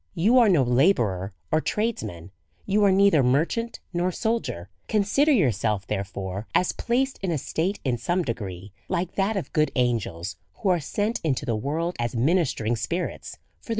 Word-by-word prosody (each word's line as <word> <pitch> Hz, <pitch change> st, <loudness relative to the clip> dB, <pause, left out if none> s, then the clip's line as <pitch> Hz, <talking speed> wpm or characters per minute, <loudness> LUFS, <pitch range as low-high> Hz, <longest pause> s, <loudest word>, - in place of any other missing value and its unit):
You 225 Hz, +10 st, +4 dB
are 230 Hz, -3 st, +5 dB
no 165 Hz, -8 st, +4 dB
labourer 120 Hz, -, +2 dB, 0.2 s
or 155 Hz, -, +3 dB
tradesman, 110 Hz, -, -3 dB, 0.3 s
you 205 Hz, +1 st, +2 dB
are 195 Hz, -, +5 dB
neither 195 Hz, -5 st, +5 dB
merchant 160 Hz, -, 0 dB
nor 175 Hz, +1 st, 0 dB
soldier; 220 Hz, -, -2 dB, 0.2 s
consider 220 Hz, +9 st, +2 dB
yourself, 110 Hz, -, +1 dB
therefore, 100 Hz, 0 st, -4 dB
as 180 Hz, -, +3 dB
placed 260 Hz, +3 st, -1 dB
in 190 Hz, -, -2 dB
a 165 Hz, -, 0 dB
state, 175 Hz, +8 st, -2 dB
in 125 Hz, -3 st, 0 dB
some 175 Hz, +6 st, 0 dB
degree, 100 Hz, -, -5 dB, 0.2 s
like 175 Hz, 0 st, -1 dB
that 200 Hz, +2 st, 0 dB
of 190 Hz, -, -5 dB
good 155 Hz, -1 st, +2 dB
angels, 95 Hz, -, -1 dB, 0.2 s
who 200 Hz, -, -1 dB
are 180 Hz, -2 st, +3 dB
sent 205 Hz, +9 st, -2 dB
into 140 Hz, -3 st, 0 dB
the 115 Hz, -4 st, 0 dB
world 160 Hz, +10 st, -2 dB
as 120 Hz, 0 st, -2 dB
ministering 125 Hz, -4 st, +1 dB
spirits 165 Hz, -, -4 dB, 0.2 s
for -, -, -24 dB
the -, -, -19 dB
155 Hz, 170 wpm, -25 LUFS, -, 0.3 s, are